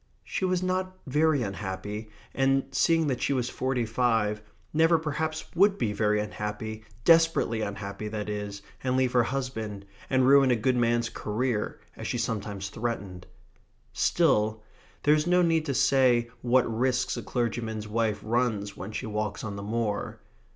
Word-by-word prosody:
She 190 - -2
was 185 0 0
not 185 0 -1
very 150 0 +2
unhappy, 100 +2 -5 0.2
and, 135 0 +2
seeing 165 -1 +3
that 130 -4 -1
she 140 - +1
was 125 -2 -1
forty 130 -2 -1
five, 110 -2 +1 0.3
never 165 +2 +5
perhaps 155 0 -3
would 195 +3 +4
be 105 - 0
very 105 0 +2
unhappy, 105 +1 -5 0.2
desperately 165 -9 +4
unhappy 100 0 -4
that 105 -1 -4
is, 105 -1 -5 0.2
and 130 0 +1
leave 130 -1 +2
her 125 - +4
husband, 110 -6 -3 0.2
and 130 -1 +3
ruin 135 -1 +6
a 125 - +4
good 125 +3 +1
man's 120 -1 +2
career, 110 0 -2 0.2
as - - -6
she - - -1
sometimes 100 -2 -3
threatened. 100 -6 -4 0.7
Still 110 -10 +2 0.4
there 150 - +5
is 155 +2 +1
no 180 0 +4
need 165 -2 +2
to 135 - -1
say 125 -4 +3
what 125 +1 +4
risks 125 +3 0
a 120 - -4
clergyman's 110 0 -2
wife 110 -1 0
runs 110 -3 0
when 100 +2 -7
she 125 - -4
walks 105 -1 -3
on 105 -2 -4
the 100 - -6
moor. 105 0 -2
120 Hz, 160 wpm, -27 LUFS, 105-135 Hz, 0.7 s, ruin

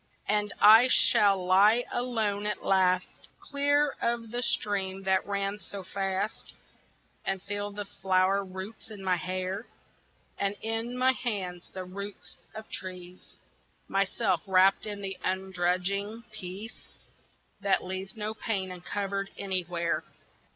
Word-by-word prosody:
AND 210 -1 +1
I 220 +4 +9
shall 195 -6 +5
lie 205 +6 +5
alone 220 -4 0
at 210 - -3
last, 185 -1 +2
Clear 285 0 +2
of 235 -1 -1
the 240 +1 -1
stream 195 -4 0
that 190 0 +2
ran 200 0 -1
so 200 -2 -8
fast, 195 +2 -3 0.7
And 195 0 -1
feel 205 0 -3
the 205 0 -6
flower 190 0 +2
roots 190 +4 -8
in 205 -3 -9
my 185 -1 +2
hair, 185 +4 -3 0.7
And 200 0 0
in 225 +2 -2
my 255 +1 +5
hands 195 -9 -3
the 185 -1 -6
roots 200 +2 -7 0.2
of 220 0 -7
trees; 180 -1 -7 0.5
Myself 195 -2 +1
wrapt 190 +2 +4
in 205 -1 -4
the 195 -1 -4
ungrudging 190 +3 -1
peace 205 +2 -9 0.6
That 200 -2 +2
leaves 190 +3 -5
no 215 0 -2
pain 200 -4 -2
uncovered 195 +2 -3
anywhere. 175 -3 -1
195 Hz, 125 wpm, -29 LUFS, 185-215 Hz, 0.7 s, I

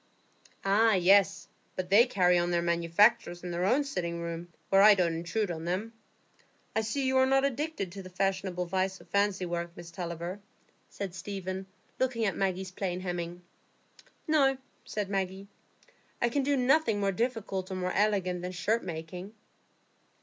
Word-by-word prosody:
"Ah 215 +3 +4
yes; 190 +2 +4 0.3
but 185 0 -4
they 230 +5 +7
carry 180 -6 +3
on 175 0 0
their 170 -1 +1
manufactures 170 +2 +2
in 180 - -4
their 175 +1 -1
own 255 +9 +3
sitting 175 -11 -3
room, 170 0 -5 0.2
where 195 0 +5
I 210 0 +9
don't 175 -3 +1
intrude 175 +5 -2
on 160 -1 -5
them. 195 +6 -2 0.8
I 220 - +3
see 245 +5 -2
you 260 0 +2
are 260 0 +5
not 270 +1 +3
addicted 280 - -2
to 195 +2 -7
the 185 - -10
fashionable 190 -1 -1
vice 190 +1 -1
of - - -17
fancy 200 -2 +1
work, 170 0 -4
Miss 170 -1 -9
Tulliver," 170 +2 -5 0.5
said 195 -3 -5
Stephen, 190 0 -5 0.3
looking 245 -3 +1
at 195 - 0
Maggie's 190 -1 -1
plain 185 -1 -3
hemming. 175 -1 -4 0.8
"No," 275 -4 +3 0.3
said 210 -2 -3
Maggie, 195 0 -3 0.7
"I 240 - +2
can 280 +4 0
do 280 +1 +1
nothing 255 -4 +3
more 200 -1 +1
difficult 205 -4 -2
or 190 - -4
more 185 0 -2
elegant 195 -4 +1
than 180 +1 -5
shirt 220 +6 0
making." 180 +4 -7
190 Hz, 165 wpm, -30 LUFS, 175-215 Hz, 0.8 s, I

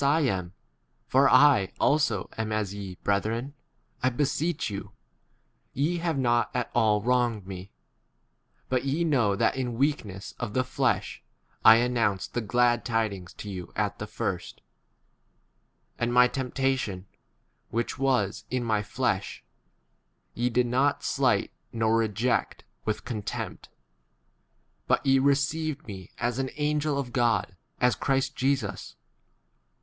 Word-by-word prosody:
There 140 - +3
are 125 - +1 0.6
different 135 -5 +5
readings, 140 -10 +1
bat 110 -2 -2
ye, 100 -2 -7
brethren, 110 +7 -1 0.5
I 130 - +3
beseech 145 +5 -1
you: 100 -2 -6 0.8
ye 155 +6 0
13 - - -5
have 165 -4 0
not 120 -2 +2
at 125 -2 -1
all 105 -3 +3
wronged 120 -4 +1
me. 95 0 -8 1.0
But 130 -1 0
ye 140 +5 0
know 125 -11 +2
that - - +2
in 125 -3 -2
weakness 110 -9 -1
w 120 - -2
of - - -12
the 130 - +3
flesh 130 - -1 0.4
I 110 - +10
announced 115 -5 0
the 120 - -1
glad 120 +2 +2
tidings 110 -6 -2
14 - - -9
to 105 - -7
you 90 -3 -8
at - - -1
the - - -5
first; - - -4 1.4
and 120 0 0
my 125 0 +6
temp 130 -1 -5
tation, 130 -9 0 0.7
which 120 +2 -2
[was] 125 -8 +1
in 125 -1 -1
my 110 -3 +1
flesh, 105 - -2 0.9
ye 120 +1 0
did 125 +1 +2
not 130 +4 +1
slight - - +1 0.2
nor 110 -1 +1
reject 115 +2 0 0.2
with 110 - +1
x - - -35
contempt; 110 -5 -5 1.2
but - - +2
ye 135 0 +5
received 145 +2 0
me 95 -5 -9
as 120 +1 -1
an 130 0 -1
angel 150 -1 0
of 130 -3 -4
God, 115 -6 +1 0.2
as 125 -1 +4
Christ 135 0 0
Jesus. 135 +1 -1
120 Hz, 140 wpm, -27 LUFS, 110-135 Hz, 1.4 s, I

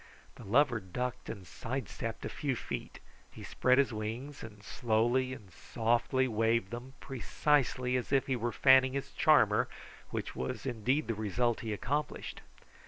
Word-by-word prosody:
The - - -12
lover 120 +3 +3
ducked 120 +6 -4
and 100 -4 -6
side 125 +5 -4
stepped 115 -1 -5
a - - -3
few 140 -3 -2
feet. - - -5 0.3
He - - -11
spread 130 0 +2
his 135 -3 +3
wings 115 +7 -5
and 105 -2 -10
slowly 120 +3 +1
and 105 -8 -9
softly 120 - +1
waved 110 -3 +1
them 120 +3 -7
precisely 130 -1 0
as 125 - -4
if 135 -1 +3
he 135 - 0
were 120 0 -1
fanning 130 +1 +5
his 140 -1 -3
charmer, - - +4 0.4
which - - -4
was 65 - -4
indeed 130 +4 0
the 115 - 0
result 110 +3 0
he 110 - -4
accomplished. 145 +8 -3
120 Hz, 160 wpm, -32 LUFS, 110-130 Hz, 0.4 s, fanning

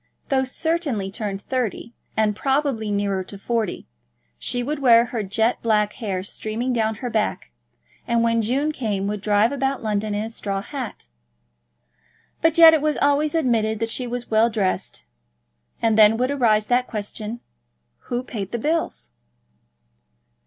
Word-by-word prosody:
Though 265 -1 +2
certainly 265 - -1
turned 200 -2 -4
thirty, 240 -2 -3 0.2
and 215 -1 +2
probably 270 -3 0
nearer 200 -2 0
to 200 - -7
forty, 225 -1 -2 0.5
she 245 0 -1
would 295 +3 -3
wear 235 -3 +6
her 240 -2 -3
jet 220 +4 0
black 210 -2 +2
hair 195 -6 -3
streaming 220 +5 -3
down 220 -2 0
her - - -1
back, 215 -1 -1 0.6
and 235 -1 +2
when 230 0 +2
June 270 +7 0
came 210 -9 -2
would 205 0 -3
drive 210 +3 +3
about 270 -2 -1
London 210 -1 -1
in 205 - -1
a 225 - -6
straw 200 -3 -4
hat. 250 - -7 1.3
But 325 0 +3
yet 330 -1 +10
it 315 - +3
was 305 0 0
always 290 +2 +2
admitted 230 -8 +1
that 225 +1 -2
she 250 +1 -2
was 245 0 -5
well 220 +2 +4
dressed. 195 - -2 0.8
And 220 -1 +3
then 215 +1 +7
would 255 +3 0
arise 220 -6 +2
that 250 +2 +1
question, 215 +1 -5 0.7
who 245 +1 -1
paid 205 -6 -5
the 235 - -1
bills? 300 - -2
230 Hz, 155 wpm, -22 LUFS, 210-255 Hz, 1.3 s, yet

